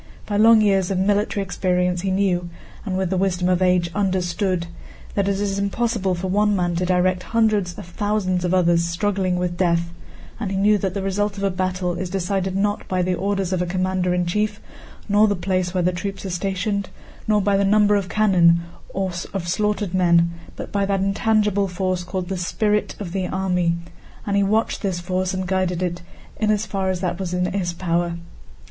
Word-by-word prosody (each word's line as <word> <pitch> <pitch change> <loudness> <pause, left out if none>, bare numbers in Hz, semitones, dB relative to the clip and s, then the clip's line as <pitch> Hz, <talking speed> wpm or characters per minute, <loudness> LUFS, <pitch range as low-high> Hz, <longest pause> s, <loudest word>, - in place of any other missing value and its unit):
By 205 - -3
long 220 +1 +7
years 195 -3 +2
of 195 - 0
military 205 +1 +1
experience 180 -1 0
he 195 - -1
knew, 185 -2 +1 0.4
and 185 -1 -1
with 190 -1 -1
the 190 - +1
wisdom 180 -1 +1
of 180 0 +2
age 180 -2 +2
understood, 185 -2 0 0.5
that 200 -1 0
it 200 -1 0
is 200 -1 -1
impossible 200 -2 0
for 175 +2 -5
one 205 +2 +2
man 175 -2 0
to 180 +1 0
direct 180 0 +2 0.2
hundreds 210 -6 +2
of - - -8
thousands 185 -1 -1
of 180 - 0
others 175 -2 +3
struggling 185 +2 0
with 180 -1 -2
death, 170 -2 +1 0.5
and 215 -4 -2
he 195 - -2
knew 205 +1 +4
that 190 0 -2
the 200 - -2
result 200 +1 -1
of 200 - -4
a 195 - +2
battle 185 -1 -1
is 175 +1 -4
decided 190 0 -1
not 205 +2 -1
by 185 -1 0
the 180 +1 0
orders 195 0 -1
of 180 - 0
a 180 - -1
commander 185 0 0
in 180 0 +1
chief, 210 +4 -1 0.5
nor 210 +1 +4
the 205 - +1
place 185 -1 -1
where 180 -1 0
the 180 - +2
troops 195 +2 -5
are 190 - -3
stationed, 195 +2 -2 0.4
nor 210 -1 +3
by 200 0 +2
the 195 - +3
number 210 +1 +4
of 195 -3 -1
cannon 175 -6 +4 0.3
or 190 -1 -1 0.2
of 175 -3 -3
slaughtered 210 +1 0
men, 170 -2 +4 0.2
but - - -7
by 200 -1 +1
that 195 -1 0
intangible 205 0 +1
force 185 0 -2
called 180 0 -4
the 190 0 -3
spirit 210 +4 0
of 190 -5 -5
the 185 0 -2
army, 180 -3 0 0.5
and 200 - -1
he 200 - +4
watched 215 +3 +1
this 190 -4 -1
force 185 +1 -1
and 185 0 -3
guided 185 -1 0
it 175 -1 -2 0.4
in 215 - +1
as 215 0 +1
far 195 -2 -2
as 185 -1 -2
that 180 -1 -2
was 180 -2 -3
in 180 0 +1
his 185 -3 -1
power. 170 -1 -1
190 Hz, 205 wpm, -22 LUFS, 180-200 Hz, 0.5 s, long